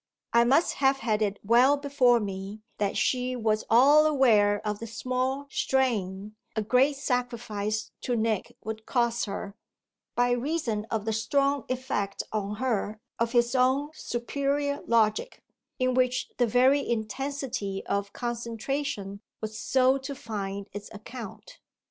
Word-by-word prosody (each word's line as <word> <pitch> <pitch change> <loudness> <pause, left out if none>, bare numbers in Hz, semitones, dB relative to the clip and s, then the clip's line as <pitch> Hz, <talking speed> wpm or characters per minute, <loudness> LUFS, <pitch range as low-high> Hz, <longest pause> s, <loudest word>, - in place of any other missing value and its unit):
I 235 0 +6
must 275 +7 +3
have 270 0 +4
had 220 -2 0
it 205 -1 0
well 245 +7 +5
before 270 -4 +3
me 200 +1 -5 0.2
that 200 -1 0
she 255 0 +1
was 220 -2 0
all 285 +6 +6
aware 215 -8 +4
of 210 -1 -2
the 230 - -6
small 255 +4 -2
strain 215 -6 0 0.2
a 220 - 0
great 255 +6 +3
sacrifice 235 -5 -2
to 245 - -1
Nick 220 -3 -1
would 220 0 -6
cost 235 -2 +1
her 200 0 -6 0.6
by 245 0 +3
reason 245 -4 -1
of 220 -2 -2
the 220 - 0
strong 275 +5 +1
effect 255 -6 -2
on 210 -1 -2
her 215 -3 -1 0.2
of 230 +1 0
his 240 0 +3
own 265 +3 +2
superior 280 +2 -2
logic, 230 - +1 0.3
in 255 -1 +1
which 255 0 +1
the 245 - +3
very 255 +5 +4
intensity 240 -3 -3
of 200 0 -2
concentration 235 -3 -3 0.2
was 220 0 -5
so 260 +2 +3
to 275 +1 -6
find 200 -6 -5
its 205 +1 -7
account. 230 - -9
235 Hz, 140 wpm, -27 LUFS, 215-265 Hz, 0.6 s, I